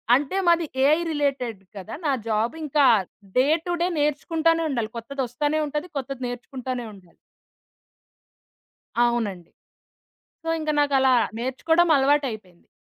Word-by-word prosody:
అంటే, 290 +8 -1
మాది 340 -1 +4 0.2
AI 300 +3 +5
related 270 -8 -1
కదా! 200 +2 -8
నా 285 - +2 0.2
జాబ్ 225 +6 0
ఇంకా 295 -1 +3 0.5
డే 260 +2 +5 0.2
టు 350 - -1
డే 350 - +3
నేర్చుకుంటానే 325 +3 +1
ఉండాలి. 235 -5 -2
కొత్తదొస్తానే 275 +4 -2
ఉంటది. 300 +4 -3
కొత్తది 270 -1 -5
నేర్చుకుంటనే 245 0 -5
ఉండాలి. 180 -4 -18 1.9
అవునండి. 215 -8 0 0.9
సో, 325 - -6
ఇంకా 310 0 -1
నాకలా 270 -2 +3 0.2
నేర్చుకోవడం 320 +8 +1
అలవాటయిపోయింది. 260 -10 0
270 Hz, 110 wpm, -24 LUFS, 235-300 Hz, 1.9 s, AI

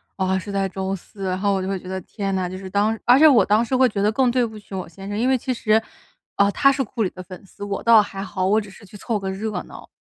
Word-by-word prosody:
啊， 190 -1 0
是 200 +2 -7
在 195 -1 0
周 190 +1 -3
四。 195 +1 -9
然 185 0 -1
后 200 0 +1
我 190 - 0
就 185 - -4
会 195 - -1
觉 185 - -12
得， 190 0 -4
天 195 +1 -4
哪， 180 -1 -1
就 185 - -6
是 190 0 -8
当 205 +3 +1
而 250 +2 +6
且 315 - +8
我 235 -10 +5
当 210 +3 +3
时 250 +3 -1
会 260 0 +5
觉 205 -2 -3
得 210 +2 +3
更 250 +1 +2
对 250 0 +2
不 220 -2 -5
起 205 -1 -14
我 185 -3 -5
先 195 +4 -11
生。 205 - -4
因 250 +3 +2
为 260 - +3
其 255 +2 -3
实， 220 -2 +2 0.6
啊， 200 0 +4
他 275 +7 +4
是 270 0 -1
库 240 -3 -3
里 190 - 0
的 185 - -10
粉 185 +1 -11
丝， 200 +1 -11
我 200 -1 -4
倒 230 -2 +7
还 195 -1 -6
好， 185 -2 -4
我 205 +3 +3
只 205 -2 -8
是 195 - -16
去 205 +1 -13
凑 215 +2 -2
个 195 -1 -4
热 210 +3 -3 0.2
闹。 - - -12
200 Hz, 335 characters per minute, -22 LUFS, 190-225 Hz, 0.6 s, 且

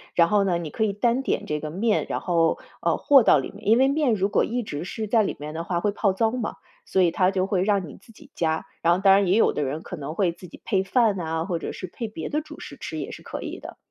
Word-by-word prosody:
然 170 -1 +5
后 205 -1 +3
呢 180 -3 +1
你 165 -3 -5
可 220 - -1
以 215 - +1
单 235 +5 +1
点 - - -1
这 150 0 -1
个 155 +1 -5
面， 210 +6 +1
然 - - -1
后， 165 -2 +1 0.2
呃， - - +1
和 280 -3 +6
到 155 - +6
里 135 - -5
面。 205 0 -12
因 225 +2 +6
为 265 - +5
面 280 -3 +2
如 195 -1 +1
果 - - +2
一 245 +2 -1
直 150 -7 -5
是 215 +4 -5
在 225 +1 +3
里 - - -2
面 150 +1 -6
的 165 +1 -4
话 175 0 -1
会 205 - +1
泡 200 -1 +1
糟 220 +3 +1
嘛， 245 -3 -3 0.3
所 190 - +1
以 175 - +4
他 185 +2 +2
就 190 -1 0
会 190 -2 0
让 200 -3 +1
你 145 - -11
自 225 - -18
己 280 +5 -18
加。 160 -1 -1 0.2
然 170 - +3
后 180 - 0
当 195 0 +6
然 195 0 +4
也 185 +4 +3
有 - - +4
的 150 - -1
人 145 +4 -3
可 - - -7
能 150 -1 -6
会 185 -3 +2
自 180 +2 -12
己 - - -13
配 190 -1 +1
饭 215 -1 +2
啊， 160 -1 -2
或 175 -2 -2
者 - - -5
是 - - -7
配 230 +6 -6
别 185 -7 -6
的 300 - -1
主 305 0 -12
食 - - -9
吃 - - -6
也 - - -5
是 - - -10
可 - - -7
以 - - -6
的。 - - -10
195 Hz, 325 characters per minute, -24 LUFS, 170-220 Hz, 0.3 s, 和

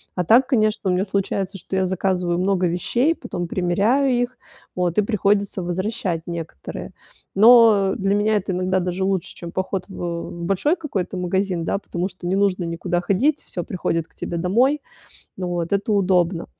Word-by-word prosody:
А 180 - 0
так, 245 +9 +5
конечно, 215 -6 +1
у - - +2
меня 180 +1 +1
случается, 195 0 -2
что 190 - -6
я 190 - +2
заказываю 180 -1 0
много 185 -1 +1
вещей, 235 - +1
потом 175 - -5
примеряю 205 +10 +2
их, 245 +1 -3 0.4
вот, 180 0 -1
и - - +6
приходится 200 -2 0
возвращать 185 0 -2
некоторые. 165 - -7 0.4
Но 220 -3 +6
для 195 +1 +1
меня 210 +1 +2
это 195 -1 -3
иногда 185 +1 0
даже 180 +1 -2
лучше, 190 -2 -1
чем 170 -1 -8
поход 190 0 -3
в 170 -2 -5
большой 195 - +1
какой-то 205 - -3
магазин, 180 -1 -1
да, - - 0
потому 180 -2 -3
что 180 -1 -8
не 185 - +1
нужно 195 -2 +1
никуда 170 +1 -2
ходить, 235 - +1
всё 175 - -5
приходит 165 -2 -2
к - - -34
тебе 170 - -4
домой. 245 - +2 0.5
Вот, 175 -2 -3
это 200 +2 0
удобно. 180 -4 +2
190 Hz, 170 wpm, -22 LUFS, 175-205 Hz, 0.5 s, и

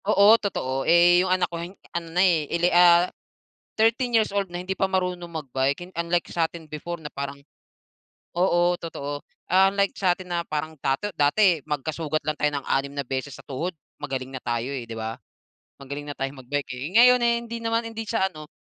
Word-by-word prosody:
Oo, 205 +1 +6
totoo. 135 -10 -2
Eh, 175 +1 +6
yung 185 - -1
anak 185 0 +3
ko 170 -1 -6
hin 180 +3 -8 0.2
ano 170 -1 -4
na, 180 +3 +3
eh, 160 -5 +2
ele 175 +1 +1
ah, 175 0 +7 0.7
13 230 +3 +2
years 220 - +2
old 200 -2 0
na 175 - -5
hindi 185 +1 -3
pa - - +2
marunong 180 -2 -1
mag-bike. 140 -3 -1
Hin 185 - -19
unlike 170 0 0
sa'tin 165 -1 -2
before 170 +3 -5
na 150 - -6
parang 140 0 -5 1.0
oo, 175 -1 +3
totoo. 145 -3 -5 0.3
Unlike 195 +2 +3
sa'tin 185 -1 +1
na 170 -1 0
parang 155 +1 -3
dato 135 +10 0
dati 165 +3 +4
magkasugat 155 +1 -2
lang 155 - 0
tayo 150 - +2
ng 140 - -6
6 140 +1 0
na 140 - -2
beses 130 +2 -4
sa - - -15
tuhod 160 +6 -3 0.3
magaling 135 -2 -4
na 130 - -4
tayo, 120 +2 -2
eh, 130 -4 -4
di - - -5
ba? 110 0 -3 0.7
Magaling 140 +2 -7
na 145 - -5
tayong 135 0 -4
mag-bike, 140 +1 -3
eh. 130 +5 -5
Ngayon, 250 +1 +7
eh, 235 0 +4
hindi 235 0 -6
naman 230 0 0
hindi 225 0 -6
siya 200 -3 0
ano, 155 -1 -10
170 Hz, 195 wpm, -25 LUFS, 140-185 Hz, 1.0 s, ah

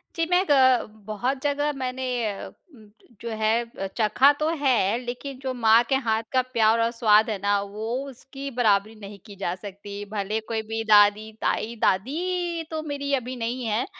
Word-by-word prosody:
जी, 330 -1 0
मैं 360 +1 +4
ग 260 -3 +4 0.2
बहुत 250 +6 -2
जगह 290 0 0
मैंने 260 -1 -4 0.5
ज - - -26 0.7
जो 235 - -5
है 220 -1 -1
चखा 235 +5 +5
तो 305 +1 +1
है, 235 -7 +2
लेकिन 250 +2 -6
जो 265 -1 -3
माँ 230 -1 +5
के 270 - +3
हाथ 225 -4 0
का 260 - +4
प्यार 225 -1 +3
और 230 0 +1
स्वाद 220 -2 +4
है 215 - -1
ना, 200 0 +2
वो 205 +2 -6 0.2
उसकी 270 +2 -8
बराबरी 220 -3 +1
नहीं 200 -1 -10
की 205 -3 -11
जा 175 -3 -1
सकती। 200 +1 -8
भले 210 +1 -2
कोई 225 -1 -2
भी 225 +1 -4
दादी, 210 0 +4
ताई 230 +2 -1
दादी 340 - 0
तो 315 -1 -3
मेरी 285 -2 -3
अभी 255 0 -4
नहीं 240 +1 -3
है। 220 +2 0
230 Hz, 175 wpm, -25 LUFS, 215-265 Hz, 0.7 s, चखा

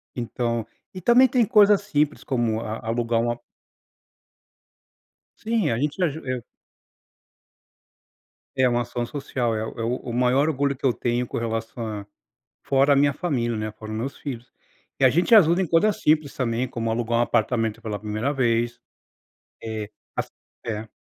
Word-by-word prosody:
Então 115 -1 -2 0.3
e 185 - -6
também 245 +6 +6
tem 245 -2 +2
coisas 205 -1 +5
simples 150 -6 0
como 120 -5 0
a 110 -1 -4
alugar 115 0 +1
uma 120 0 -1 2.0
Sim, 220 - +1
a 115 - 0
gente 150 +6 -1
ajuda 155 -3 -2
eu 125 -2 -2 2.1
É 130 -1 +4
uma 120 0 +1
ação 120 0 -3
social, 125 -3 -2
é 110 - -2
o 115 - -8
é - - -1
o 120 0 -3
maior 125 +5 +3
orgulho 140 -1 0
que 135 - -6
eu 125 - +4
tenho 120 +1 -1
com - - -4
relação 115 0 -3
a 105 -2 -5 0.6
fora 140 +1 +4
a - - +3
minha 140 0 +3
família. 125 -10 -1
né, 110 0 -3
fora 110 0 -10
os 110 - -3
meus 130 +5 -4
filhos. 125 -4 -7 0.5
E 135 - +5
a - - +8
gente 175 - +4
ajuda 175 -2 +6
em 185 - -1
coisas 180 +6 +2
simples 150 -2 +2
também, 120 0 -1
como 115 -2 -3
alugar 115 +1 0
um - - +4
apartamento 115 -2 0
pela 105 -2 -4
primeira 110 +7 -2
vez 120 -2 0 0.8
Eh, 110 -2 -5 0.3
assim, - - -2 0.4
é. 110 -1 -4
120 Hz, 165 wpm, -24 LUFS, 115-145 Hz, 2.1 s, a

